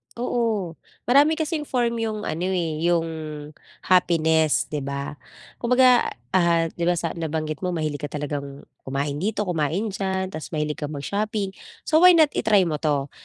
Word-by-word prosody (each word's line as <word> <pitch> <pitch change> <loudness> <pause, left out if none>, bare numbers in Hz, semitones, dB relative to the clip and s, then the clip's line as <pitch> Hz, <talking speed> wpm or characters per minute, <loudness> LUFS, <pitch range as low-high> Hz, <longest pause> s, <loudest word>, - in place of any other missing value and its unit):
Oo. 230 -7 -1 0.3
Marami 285 +5 +4
kasing 310 -2 -2
form 235 -2 0
'yong 215 -2 -3
ano, 175 +3 -2
eh, 165 -4 -1
'yong 170 -1 +1 0.7
happiness 160 -4 +3
di 150 - -4
ba? 140 +1 -4 0.5
Kumbaga, 250 0 +4 0.2
ah, 170 -2 +3
di 170 - -4
ba 175 - +2
sa - - -2
nabanggit 155 -2 -3
mo, 185 - -1
mahilig 155 -3 -2
ka 145 - -3
talagang 145 -1 -5 0.2
kumain 140 +2 -2
dito, 210 +1 -1
kumain 180 +5 -1
diyan. 190 -1 -2
Ta's 155 - -6
mahilig 150 0 -2
ka 150 - -3
mag-shopping, 200 +7 -2 0.3
so 315 +1 +4
why 360 -1 +8
not, 310 -3 +5
i-try 210 -4 +3
mo 155 -3 -2
'to? 145 -3 0
175 Hz, 160 wpm, -23 LUFS, 155-220 Hz, 0.7 s, why